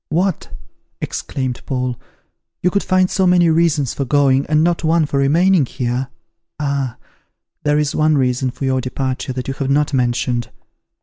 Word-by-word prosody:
"What!" 180 +1 -1 0.5
exclaimed 130 -3 -4
Paul, 125 -2 -1 0.7
"you 180 - +3
could 200 - +1
find 185 0 +2
so 190 0 +1
many 175 -2 +4
reasons 155 -5 +2
for 140 - -2
going, 135 0 +2
and 155 0 +3
not 170 0 +1
one 160 0 +3
for 140 -1 -1
remaining 165 +2 +3
here! 125 +2 -2 0.5
Ah! 140 -4 -2 0.6
there 150 0 +1
is 150 -1 0
one 155 -1 +2
reason 130 0 +1
for 130 +2 -5
your 130 -1 +1
departure 130 +1 -3
that 125 0 -5
you 135 - -2
have 135 0 -3
not 145 +1 +1
mentioned. 120 -1 0
140 Hz, 165 wpm, -18 LUFS, 130-160 Hz, 0.7 s, many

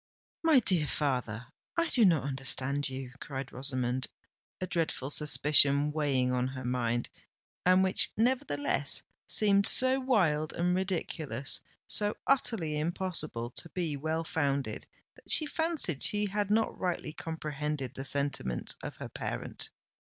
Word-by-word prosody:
"My 320 -5 +5
dear 180 -9 +2
father—I 130 - -2
do 235 -4 +5
not 165 -7 +4
understand 135 +1 -1
you!" 130 -1 -6
cried 135 -2 -6
Rosamond, 130 -1 -1 0.5
a 185 - -2
dreadful 160 -6 -2
suspicion 145 -1 +4
weighing 140 -4 +1
on 125 0 +1
her 130 -1 -6
mind; 120 -1 -1 0.6
and 185 +1 +6
which, 190 0 +2
nevertheless, 220 - +1 0.2
seemed 200 -2 +4
so 260 +1 +4
wild 175 - +1
and 180 +1 +1
ridiculous—so 180 - -2
utterly 195 - +1
impossible 155 -7 -3
to 170 - -5
be 165 -5 -2
well 160 +3 -2
founded, 140 -4 -2 0.3
that - - -13
she 310 - +7
fancied 315 - 0
she 210 0 +2
had 205 0 -1
not 220 +1 +2
rightly 175 -4 -2
comprehended 150 -4 -4
the 135 - -6
sentiments 140 - -1
of - - -6
her - - -7
parent. - - -4
150 Hz, 130 wpm, -30 LUFS, 135-190 Hz, 0.6 s, she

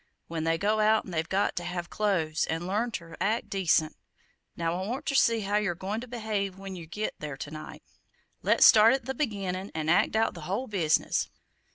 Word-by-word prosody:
When 165 -1 -3
they 165 0 +2
go 210 +4 +1
out 215 +1 +3
they've 165 -3 -3
got 195 +2 +1
to 175 - -2
have 175 -1 -5
close, 175 -7 0
and 165 +2 -2
learn 210 +6 0
ter 170 -7 -7
act 215 +5 0
decent! 165 -5 +2 0.6
Now, 170 +2 -1
I 190 - -4
want 250 +4 -4
ter - - -1
see 230 -4 +4
how 205 +1 0
yer 210 -5 0
goin' 200 +6 -4
to 250 - -8
behave 215 -5 -3
when 195 -1 -7
yer 170 -3 -9
git 210 +6 -3
there 150 -3 -6
to 145 - -7
night. 155 0 -9 0.6
Let's - - +5
start 220 +2 +8
in 270 - 0
at - - -22
the 265 - -2
beginnin' 200 -8 -3
'n 155 -1 -2
act 175 +4 +3
out 225 0 +2
the - - -9
whole 215 +7 -1
business. 180 -9 +1
195 Hz, 215 wpm, -28 LUFS, 170-215 Hz, 0.6 s, start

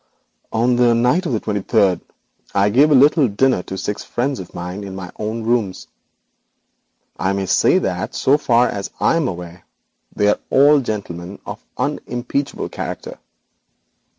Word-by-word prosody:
'On 120 +2 +2
the 120 -1 +4
night 125 +10 +2
of - - -2
the 110 - 0
twenty 105 -1 -2
third, 100 -3 +2 0.5
I 100 +1 +3
gave 140 +7 +5
a 150 - +5
little 145 +1 +5
dinner 120 0 +2
to 95 +1 -7
six 105 +2 -4
friends 135 +3 -2
of 90 - -10
mine 90 +3 -5
in 95 -1 -7
my 90 -2 -7
own 110 +2 -3
rooms. 110 -5 -1 1.3
I 95 +1 +1
may 100 0 -1
say - - +3
that - - -2
so 140 +3 +3
far 120 -3 +3
as 100 -4 -4
I - - +3
am 165 -5 +1
aware 90 -1 -7 0.5
they 105 - +2
are - - +1
all 145 +2 +5
gentlemen 100 -6 -5
of - - -8
unimpeachable 125 +3 -3
character. - - -6
110 Hz, 160 wpm, -19 LUFS, 95-130 Hz, 1.3 s, gave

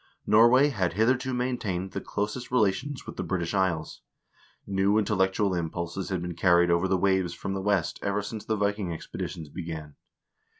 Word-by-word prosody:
Norway 120 +6 +6
had 95 - -1
hitherto 125 +5 +2
maintained 115 -7 -2
the - - -4
closest 105 +5 -3
rela 110 -6 +3
tions 140 +4 -6
with - - -9
the - - -2
British 85 -2 -2
Isles. 90 -5 -1 0.6
New 100 +1 +2
intellectual 100 -1 +1
impulses 85 +2 -3
had 95 -3 -2
been 90 0 -4
carried 85 0 +4
over 85 +2 +2
the 95 0 +2
waves 95 -2 +1
from 95 - -4
the 95 - -2
West 95 -4 0
ever 100 0 -1
since 110 +1 -6
the 110 - -1
Viking 100 -1 0
expedi 85 -2 -5
tions 80 -3 -8
began. 80 -3 -6
95 Hz, 175 wpm, -27 LUFS, 85-105 Hz, 0.6 s, Norway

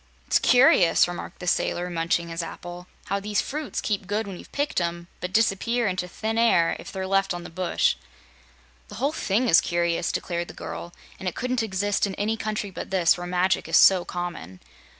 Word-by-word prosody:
"It's - - +3
curious," 245 -11 +5
remarked 175 0 -7
the - - -8
sailor, 175 0 0
munching 170 0 0
his 165 +1 -3
apple, 175 +2 -8 0.2
"how 200 +1 -1
these 205 +1 -1
fruits 300 0 -3
keep 200 -3 -2
good 210 +3 -1
when 195 -2 -7
you've - - -13
picked 285 -9 -1
'em, 170 0 -3
but 180 - -4
dis'pear 230 +3 +1
inter 185 -2 -1
thin 220 +5 -2
air 175 -8 +4
if - - -9
they're 190 -1 -4
left 195 -1 +1
on 175 - -6
the - - -9
bush." 180 +1 +1 0.9
"The 205 - -10
whole 270 +7 0
thing 240 -4 0
is 170 - +6
curious," 170 0 0
declared 170 -1 -3
the - - -11
girl, 175 - -7 0.3
"and 190 - -5
it - - -12
couldn't 250 0 -1
exist 205 -1 0
in 190 - -5
any 215 +2 0
country 215 -2 -3
but - - -7
this, 180 -3 +3
where 175 0 -6
magic 180 +1 +1
is - - +4
so 185 -2 +6
common. 170 - -6
190 Hz, 200 wpm, -25 LUFS, 175-215 Hz, 0.9 s, is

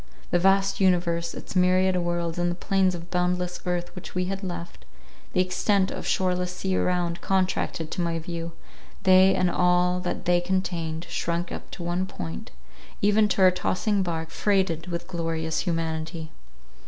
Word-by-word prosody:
The 175 - +3
vast 195 +1 +3
universe, 170 -2 +2
its - - -8
myriad 185 +1 +4
worlds, 175 -1 -1
and 175 0 +1
the 175 - -2
plains 190 0 +1
of 175 0 -9
boundless 180 0 0
earth 175 +1 -2
which 180 - -9
we 180 0 +1
had 195 +1 -3
left—the 170 - -7
extent 185 +1 +2
of - - -5
shoreless 180 -1 0
sea 190 0 -1
around—contracted 180 -2 0
to - - -2
my 170 -1 0
view—they 175 +3 +1
and 180 -1 +2
all 180 0 +3
that 180 0 -4
they 175 0 +3
contained, 175 -3 -2
shrunk 170 +1 -2
up - - -7
to 175 - -7
one 175 +2 -1
point, 85 - -6 0.5
even 210 +1 +4
to 195 -2 +2
our 185 - +8
tossing 185 +3 0
bark, 165 -3 -3
freighted 190 -5 +1
with 170 -1 -4
glorious 165 -2 -2
humanity. 160 -1 -3
180 Hz, 155 wpm, -26 LUFS, 170-185 Hz, 0.5 s, our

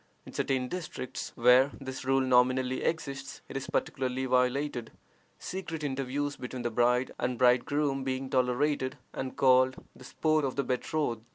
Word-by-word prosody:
In - - -11
certain 130 -2 0
districts 155 -6 -5
where 125 +3 +6
this 130 -1 -6
rule 135 +1 +2
nominally 130 0 +3
exists 135 -4 -3
it - - -10
is 135 - -3
practically 130 0 -1
violated, 125 -1 +1 0.5
secret 165 -4 -5
interviews 140 +1 -2
between 125 0 -6
the 120 - -1
bride 125 +2 +2
and 125 0 -1
bridegroom 135 +3 +2
being 130 0 -2
tolerated, 130 +1 +1 0.2
and 130 -1 -5
called 130 -1 +5 0.2
"the - - -14
sport 155 +4 +1
of 135 -2 -1
the 140 - 0
betrothed." 125 -2 -1
130 Hz, 150 wpm, -30 LUFS, 125-140 Hz, 0.5 s, where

